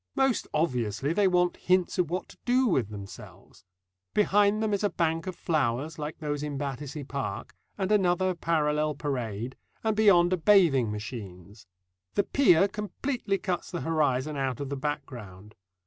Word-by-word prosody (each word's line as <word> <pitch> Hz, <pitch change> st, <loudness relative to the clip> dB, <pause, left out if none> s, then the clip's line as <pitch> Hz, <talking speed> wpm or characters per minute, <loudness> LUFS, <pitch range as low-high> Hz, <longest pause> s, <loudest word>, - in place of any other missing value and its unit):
Most 270 Hz, -3 st, +1 dB
obviously 125 Hz, -2 st, 0 dB
they 200 Hz, +2 st, +3 dB
want 180 Hz, -1 st, +2 dB
hints 185 Hz, 0 st, +1 dB
of 175 Hz, -4 st, +2 dB
what 180 Hz, +1 st, -3 dB
to -, -, -15 dB
do 255 Hz, +1 st, +3 dB
with 135 Hz, -, +1 dB
themselves. 100 Hz, -2 st, -11 dB, 0.5 s
Behind 205 Hz, +1 st, +3 dB
them 215 Hz, -1 st, 0 dB
is 200 Hz, -, 0 dB
a 205 Hz, -, +3 dB
bank 165 Hz, 0 st, -1 dB
of 185 Hz, -, -4 dB
flowers 150 Hz, 0 st, -1 dB
like 150 Hz, +1 st, -5 dB
those 145 Hz, -2 st, -3 dB
in 150 Hz, -2 st, -4 dB
Battersea 145 Hz, +1 st, -5 dB
Park, 130 Hz, -6 st, -5 dB, 0.2 s
and 195 Hz, 0 st, -1 dB
another 185 Hz, -2 st, +2 dB
parallel 150 Hz, -3 st, 0 dB
parade, 125 Hz, -5 st, -3 dB, 0.3 s
and 220 Hz, -1 st, +1 dB
beyond 185 Hz, -5 st, +5 dB
are -, -, +2 dB
bathing 160 Hz, -, +4 dB
machines. 105 Hz, -3 st, -8 dB, 0.5 s
The 205 Hz, -, +3 dB
pier 195 Hz, -7 st, +4 dB
completely 210 Hz, +1 st, -3 dB
cuts 185 Hz, -3 st, -3 dB
the 175 Hz, -, -4 dB
horizon 150 Hz, -3 st, 0 dB
out 135 Hz, -3 st, -2 dB
of 140 Hz, -2 st, -4 dB
the 140 Hz, -, -2 dB
background. 120 Hz, -9 st, -6 dB
155 Hz, 160 wpm, -28 LUFS, 130-185 Hz, 0.5 s, beyond